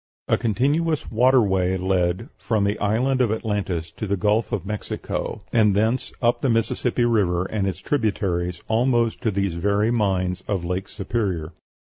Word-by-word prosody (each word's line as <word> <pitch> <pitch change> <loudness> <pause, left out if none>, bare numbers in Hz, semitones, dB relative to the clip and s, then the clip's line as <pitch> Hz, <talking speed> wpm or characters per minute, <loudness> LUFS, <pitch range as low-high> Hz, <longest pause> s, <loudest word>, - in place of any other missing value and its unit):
A - - +3
continuous 145 +7 0
water 125 +2 +5
way 95 -2 +1
led, 95 +4 0
from 110 -3 0
the 100 +1 0
island 125 +6 +1
of 120 -4 +2
Atlantis 100 -7 -2
to 110 - -3
the 100 +1 0
Gulf 105 +3 +1
of 100 -4 -2
Mexico, 105 +1 -4
and 105 -4 +4
thence 110 +5 +1
up 120 0 +2
the 135 - +1
Mississippi 115 +1 +1
River 95 -6 +2
and 100 -1 -1
its 95 -3 -2
tributaries 95 -7 -1
almost 120 0 +1
to 115 - +1
these 100 -3 -1
very 100 +6 +1
mines 95 -5 0
of 95 -4 -1
Lake 90 +2 -2
Superior. 95 -6 -3
105 Hz, 160 wpm, -23 LUFS, 95-115 Hz, -, water